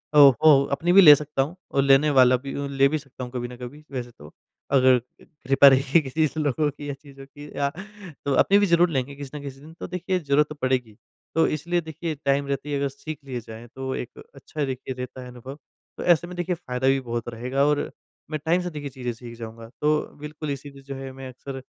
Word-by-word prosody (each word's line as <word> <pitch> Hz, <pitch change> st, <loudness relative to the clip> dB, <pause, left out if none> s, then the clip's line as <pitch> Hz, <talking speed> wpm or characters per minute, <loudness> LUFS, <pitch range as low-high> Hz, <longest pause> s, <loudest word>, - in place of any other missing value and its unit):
ओह 140 Hz, -3 st, +9 dB
हो 140 Hz, -3 st, +7 dB
अपनी 170 Hz, +5 st, +1 dB
भी 195 Hz, -, +9 dB
ले 150 Hz, -4 st, +11 dB
सकता 150 Hz, -1 st, -2 dB
हूँ 150 Hz, +7 st, -3 dB, 0.2 s
और 135 Hz, -, +2 dB
लेने 140 Hz, +2 st, +5 dB
वाला 130 Hz, -2 st, +6 dB
भी 135 Hz, -, -5 dB
उ 140 Hz, 0 st, -3 dB
ले 140 Hz, 0 st, +3 dB
भी 155 Hz, -, 0 dB
सकता 135 Hz, -3 st, -10 dB
हूँ, 125 Hz, -, -7 dB
कभी 120 Hz, -1 st, -4 dB
न 125 Hz, -, -10 dB
कभी 130 Hz, +5 st, -9 dB
वैसे 125 Hz, -2 st, -5 dB
तो, 75 Hz, -7 st, -15 dB, 0.4 s
अगर 130 Hz, -2 st, +5 dB
कृ 125 Hz, -, -23 dB, 0.2 s
कृपा 135 Hz, +1 st, +7 dB
रही 135 Hz, +4 st, +5 dB
किसी 150 Hz, +3 st, -1 dB
ऐसे 155 Hz, +1 st, -1 dB
लोगों 150 Hz, +1 st, +1 dB
की 145 Hz, 0 st, -9 dB
या -, -, -2 dB
चीज़ों 140 Hz, -1 st, -13 dB
की 145 Hz, +1 st, -12 dB
या 140 Hz, 0 st, +1 dB, 0.6 s
तो 140 Hz, -, +1 dB
अपनी 195 Hz, +9 st, +5 dB
भी 205 Hz, -, +4 dB
ज़रूर 170 Hz, -1 st, +4 dB
लेंगे 140 Hz, -1 st, -2 dB
किसी 140 Hz, -1 st, -8 dB
ना 150 Hz, -, -5 dB
किसी 135 Hz, -1 st, -8 dB
दिन। 155 Hz, +3 st, -13 dB
तो -, -, -5 dB
देखिए, 180 Hz, +1 st, -2 dB
ज़रूरत 145 Hz, -1 st, +2 dB
तो 150 Hz, -, -7 dB
पड़ेगी, 130 Hz, -6 st, -1 dB, 0.4 s
तो 165 Hz, -, +4 dB
इसलिए 170 Hz, +4 st, -1 dB
देखिए 160 Hz, 0 st, -5 dB
टाइम 140 Hz, 0 st, +2 dB
रहते 140 Hz, +1 st, -3 dB
ही 145 Hz, -, -1 dB
अगर 140 Hz, 0 st, 0 dB
सीख 145 Hz, +3 st, -8 dB
लिया 130 Hz, -3 st, -4 dB
जाए, 110 Hz, +2 st, -10 dB
तो 130 Hz, +2 st, -5 dB
एक 120 Hz, -, -7 dB
अच्छा 145 Hz, +2 st, -4 dB
देखिए 130 Hz, 0 st, -5 dB
रहता 125 Hz, 0 st, -7 dB
है 125 Hz, -, -9 dB
अनुभव। 125 Hz, +3 st, -9 dB, 0.4 s
तो -, -, -5 dB
ऐसे 175 Hz, -1 st, +3 dB
में 180 Hz, -, -8 dB
देखिए 175 Hz, 0 st, -1 dB
फ़ायदा 130 Hz, -5 st, -3 dB
भी 135 Hz, 0 st, +4 dB
बहुत 120 Hz, -2 st, -4 dB
रहेगा 125 Hz, +4 st, 0 dB
और 150 Hz, 0 st, 0 dB, 0.4 s
मैं 155 Hz, -, -2 dB
टाइम 175 Hz, +3 st, +3 dB
से 180 Hz, -, -3 dB
देखिए 150 Hz, -3 st, -6 dB
चीज़ें 125 Hz, -2 st, -4 dB
सीख 115 Hz, 0 st, -11 dB
जाऊँगा। 115 Hz, 0 st, -9 dB
तो 150 Hz, 0 st, +3 dB, 0.2 s
बिल्कुल 150 Hz, 0 st, -6 dB
इसीलिए 140 Hz, 0 st, -8 dB
जो 135 Hz, 0 st, -7 dB
है 135 Hz, 0 st, -7 dB
मैं 130 Hz, 0 st, -9 dB
अक्सर 135 Hz, +1 st, -8 dB
140 Hz, 240 wpm, -24 LUFS, 130-150 Hz, 0.6 s, ले